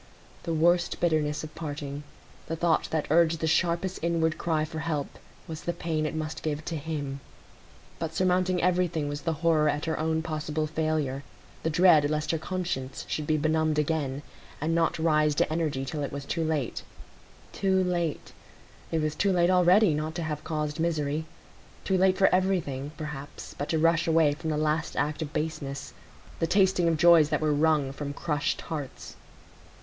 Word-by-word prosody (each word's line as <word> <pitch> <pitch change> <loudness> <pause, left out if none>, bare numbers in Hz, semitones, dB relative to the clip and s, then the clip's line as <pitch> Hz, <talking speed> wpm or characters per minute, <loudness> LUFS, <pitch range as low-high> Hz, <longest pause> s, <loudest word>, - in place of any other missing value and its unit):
The 165 - -3
worst 175 +2 +2
bitterness 155 -3 +1
of 155 - -8
parting—the 145 +1 -7
thought 165 -1 +1
that 160 -2 -1
urged 165 0 +4
the 160 - -1
sharpest 170 +3 +1
inward 165 -1 +1
cry 155 -2 0
for 160 +1 -6
help—was 155 0 -6
the 175 - -2
pain 155 -3 -2
it 155 - -5
must 155 0 -4
give 155 0 -3
to 170 - -3
him. 145 -3 -4 0.8
But 165 -1 -4
surmounting 185 -1 +1
everything 175 -4 +1
was 145 0 -4
the 165 +3 -1
horror 155 -2 +4
at 145 +1 -1
her 160 -2 -2
own 160 0 0
possible 155 -1 -2
failure, 155 -3 -1 0.4
the 160 - 0
dread 160 -3 +5
lest 155 0 -1
her 165 - -1
conscience 170 -8 -4
should 150 -1 -3
be 155 - +2
benumbed 155 0 +1
again, 145 -2 -1 0.4
and 160 +3 0
not 165 -1 +1
rise 155 -2 +2
to 155 - +1
energy 150 -5 -1
till 150 +2 -4
it 140 - -3
was 140 0 -6
too 165 +3 -1
late. 155 -6 -1 0.7
Too 190 -1 +2
late! 175 -4 -2 0.6
it 160 -2 0
was 155 -1 0
too 200 +3 +1
late 175 -1 +3
already 180 +1 +5
not 155 +2 -3
to 170 - -2
have 150 -2 -4
caused 150 0 -3
misery; 155 -2 -1 0.6
too 190 - +1
late 185 0 +3
for 195 - +5
everything, 170 -7 0
perhaps, 150 -2 -7
but 145 - -4
to 160 - +1
rush 165 +1 +3
away 160 -2 +4
from 160 +2 -5
the 155 - 0
last 155 +1 0
act 150 +2 -1
of 150 -2 -4
baseness,—the 140 - -5
tasting 190 -1 +3
of 165 -1 +2
joys 165 -2 +6
that - - +1
were 155 -1 +1
wrung 150 -2 +2
from 140 +1 -5
crushed 150 -1 -1
hearts. 145 -5 -6
155 Hz, 175 wpm, -27 LUFS, 150-170 Hz, 0.8 s, joys